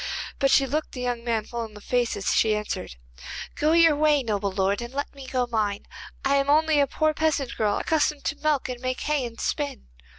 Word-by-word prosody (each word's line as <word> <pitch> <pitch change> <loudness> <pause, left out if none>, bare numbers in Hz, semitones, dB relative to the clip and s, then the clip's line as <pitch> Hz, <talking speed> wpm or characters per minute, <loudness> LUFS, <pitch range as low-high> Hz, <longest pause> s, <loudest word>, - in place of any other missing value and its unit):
But 275 - +3
she 275 - +5
looked 300 +4 -2
the 250 - -5
young 245 -1 -2
man 225 -3 -1
full 235 0 -4
in 220 -2 -9
the - - -9
face 240 +2 0
as 195 - 0
she 215 -1 +3
answered: 210 - -4 0.6
'Go 305 +2 +2
your 330 -2 +6
way, 295 -2 +3
noble 205 -3 -1
lord, 195 +2 0
and 235 0 -6
let 280 +2 -4
me 275 -2 -10
go 255 -1 0
mine. 215 -4 -1 0.4
I 280 +1 +3
am 275 0 +1
only 310 0 +4
a 280 - +4
poor 310 +3 +1
peasant 300 -5 0
girl, 210 -2 +1
accustomed 305 -2 0
to - - -1
milk, 295 -2 0
and 250 -1 -6
make 255 0 -2
hay 300 -3 0
and 230 0 -12
spin. 285 - -3
260 Hz, 225 wpm, -25 LUFS, 225-295 Hz, 0.6 s, your